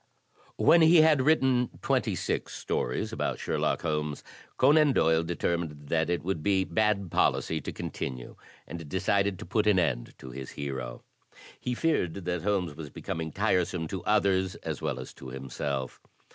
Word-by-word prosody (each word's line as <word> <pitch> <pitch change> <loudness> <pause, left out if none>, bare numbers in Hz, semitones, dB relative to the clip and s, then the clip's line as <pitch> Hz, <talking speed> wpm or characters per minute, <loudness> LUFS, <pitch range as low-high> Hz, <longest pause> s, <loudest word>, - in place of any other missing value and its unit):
When 170 - +6
he 160 0 +7
had 155 -3 +5
written 130 -4 +3
twenty - - +1
six - - -3
stories 60 - -2
about - - -1
Sherlock - - -1
Holmes, 75 -2 -2 0.3
Conan 145 +1 +5
Doyle 80 -6 +3
determined 80 -3 -2
that 80 0 +1
it 85 -4 -1
would 90 -3 -2
be 95 +2 +2
bad 105 -3 0
policy - - +1
to - - -5
continue 60 -2 -5 0.3
and 85 -3 -8
decided 95 +2 +1
to - - -8
put 105 +4 0
an 105 -3 +5
end 60 -9 0
to 65 - -10
his 65 +1 -7
hero. 65 -4 -5 0.6
He 125 - -2
feared 150 - +1
that 90 -3 -3
Holmes 90 -6 0
was 75 -2 -7
becoming 80 +2 -5
tiresome 90 0 0
to 95 -3 -5
others 95 -3 +2
as - - -3
well - - -2
as 65 - -8
to 65 - -11
himself. 65 0 -4
85 Hz, 160 wpm, -28 LUFS, 75-105 Hz, 0.6 s, he